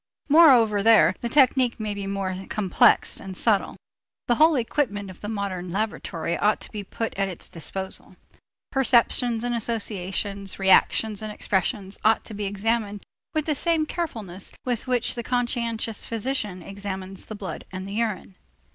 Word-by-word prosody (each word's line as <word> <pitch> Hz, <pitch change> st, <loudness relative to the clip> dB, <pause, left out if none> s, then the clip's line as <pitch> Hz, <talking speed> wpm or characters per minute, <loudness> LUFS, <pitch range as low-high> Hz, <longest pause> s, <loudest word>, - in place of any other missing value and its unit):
Moreover 250 Hz, -10 st, +6 dB
there 205 Hz, -6 st, +6 dB
the 235 Hz, -, -2 dB
technique 255 Hz, -2 st, +3 dB
may 215 Hz, -1 st, -2 dB
be 200 Hz, -1 st, -5 dB
more 195 Hz, -1 st, -3 dB
complex 195 Hz, -4 st, +3 dB
and 190 Hz, -1 st, -7 dB
subtle. 215 Hz, -4 st, +1 dB, 0.5 s
The 240 Hz, -, +4 dB
whole 320 Hz, 0 st, +6 dB
equipment 225 Hz, -6 st, -1 dB
of 180 Hz, -, -15 dB
the 210 Hz, -, -5 dB
modern 195 Hz, -4 st, -3 dB
laboratory 175 Hz, -4 st, -2 dB
ought 210 Hz, +1 st, +2 dB
to -, -, -7 dB
be 210 Hz, -2 st, -5 dB
put 225 Hz, +3 st, -4 dB
at 195 Hz, -, +2 dB
its 180 Hz, -, -7 dB
disposal. 190 Hz, +3 st, -4 dB, 0.6 s
Perceptions 240 Hz, -3 st, +3 dB
and 245 Hz, 0 st, -1 dB
associations, 200 Hz, -3 st, -2 dB
reactions 200 Hz, +2 st, +3 dB
and 215 Hz, 0 st, -4 dB
expressions 195 Hz, 0 st, -2 dB
ought 220 Hz, 0 st, +3 dB
to 220 Hz, -, -9 dB
be 205 Hz, 0 st, -4 dB
examined 205 Hz, +1 st, -1 dB, 0.3 s
with 310 Hz, -1 st, 0 dB
the 310 Hz, -, +1 dB
same 320 Hz, +2 st, +1 dB
carefulness 220 Hz, -, -5 dB
with 245 Hz, -1 st, -2 dB
which 250 Hz, -2 st, +1 dB
the 240 Hz, -, -4 dB
conscientious 235 Hz, -3 st, -1 dB
physician 225 Hz, -5 st, -3 dB
examines 195 Hz, -1 st, -6 dB
the 215 Hz, -, -6 dB
blood 200 Hz, -2 st, -7 dB
and 185 Hz, 0 st, -6 dB
the 200 Hz, -, -6 dB
urine. 210 Hz, -, -2 dB
210 Hz, 155 wpm, -25 LUFS, 195-235 Hz, 0.6 s, Moreover